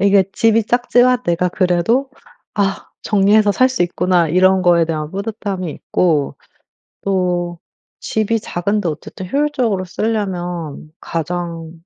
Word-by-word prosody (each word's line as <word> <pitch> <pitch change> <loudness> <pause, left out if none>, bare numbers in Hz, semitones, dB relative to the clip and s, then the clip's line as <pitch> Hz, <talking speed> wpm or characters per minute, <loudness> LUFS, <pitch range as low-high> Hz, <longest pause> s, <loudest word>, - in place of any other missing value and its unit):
이게 200 -1 +4
집이 225 -1 +3
작지만 245 +1 +3
내가 175 +1 0
그래도 185 +9 +1 0.5
'아 195 -2 -1 0.2
정리해서 205 0 +3
살 255 +5 +3
수 255 -8 0
있구나.' 175 -1 +1
이런 185 +3 +4
거에 170 -2 +4
대한 155 -2 -3
뿌듯함이 200 -3 -4
있고 150 -1 0 0.7
또 180 -3 -1 0.4
집이 220 +1 0
작은데 200 0 -2
어쨌든 180 +4 -6
효율적으로 260 -9 0
쓰려면 180 -7 -3
가장 165 0 -4
185 Hz, 270 characters per minute, -18 LUFS, 175-215 Hz, 0.7 s, 이게